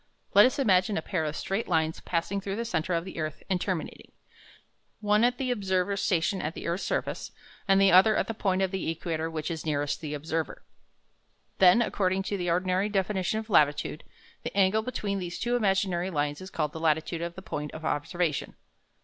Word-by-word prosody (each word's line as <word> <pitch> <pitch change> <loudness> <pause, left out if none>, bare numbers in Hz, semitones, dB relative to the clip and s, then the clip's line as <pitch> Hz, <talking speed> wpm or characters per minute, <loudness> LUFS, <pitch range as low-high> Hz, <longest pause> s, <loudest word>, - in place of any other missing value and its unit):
Let 205 +4 +8
us 260 - -3
imagine 200 -5 +3
a - - 0
pair 175 -5 -1
of 150 0 -3
straight 195 +4 -2
lines 160 -2 +1
passing 180 +3 -2
through 195 0 -3
the 230 +2 -3
centre 180 -5 -1
of 165 +1 -1
the 190 - -7
earth 155 -1 -4
and 180 -1 +1
terminating, 185 -5 -4 0.9
one 210 +1 +3
at 245 +1 +3
the 260 -2 -1
observer's 195 -3 0
station 180 +2 +1
on 155 - -2
the - - -7
earth's 170 +3 -1
surface, - - -2 0.4
and 195 0 +5
the 195 0 +5
other 195 +4 +7
at - - +1
that 225 -1 -6
point 190 -1 +1
of 190 - 0
the 190 -4 -2
equator 165 0 -2
which 160 +1 -4
is 160 -2 -4
nearest 145 -2 -1
the 150 -2 -4
observer. 160 +1 -3 1.0
Then, 190 +5 +7
according 190 -3 0
to 200 - -2
the 175 -2 -2
ordinary 185 +3 +1
definition 195 0 0
of 220 0 -4
latitude, 150 -1 +2 0.4
the - - -6
angle 200 +2 +4
between 210 -4 -3
these 175 -1 -5
two 240 +1 0
imaginary 190 -5 +1
lines 145 -2 -2
is 185 - -8
called 150 -5 -2
the 160 - -6
latitude 160 +1 0
of 170 0 -4
the 190 - -9
point 150 -4 -4
of 160 0 -8
observation. 160 +1 -1
185 Hz, 200 wpm, -28 LUFS, 160-200 Hz, 1.0 s, Let